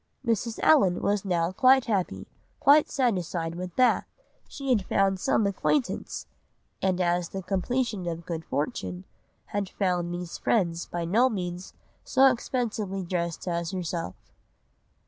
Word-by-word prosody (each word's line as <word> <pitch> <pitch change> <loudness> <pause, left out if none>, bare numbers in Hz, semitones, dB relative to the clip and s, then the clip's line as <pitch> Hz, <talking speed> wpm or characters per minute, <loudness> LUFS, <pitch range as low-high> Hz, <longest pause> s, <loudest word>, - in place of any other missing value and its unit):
"Mrs. 230 0 0
Allen 195 - +5
was 205 -1 +1
now 175 -3 0
quite 260 +6 +5
happy, 200 -5 -1 0.3
quite 295 +2 +5
satisfied 180 - -1
with 180 0 -6
Bath. 255 -1 +3 0.4
She 275 -2 -6
had 225 -6 +3
found 195 0 +1
some 210 - +2
acquaintance—and 195 -4 -2
as 175 -1 +1
the 190 -1 -5
completion 205 0 -1
of 170 0 -4
good 165 -2 -4
fortune, 180 - -3 0.5
had 200 -2 -1
found 180 -3 -1
these 175 -1 -5
friends 170 -6 0
by 170 -1 -3
no 230 +9 +3
means 180 -4 -5 0.3
so 270 0 +5
expensively 220 -6 -2
dressed 170 -1 -3
as 170 -1 -1
herself." 175 - -4
185 Hz, 130 wpm, -27 LUFS, 175-230 Hz, 0.5 s, Allen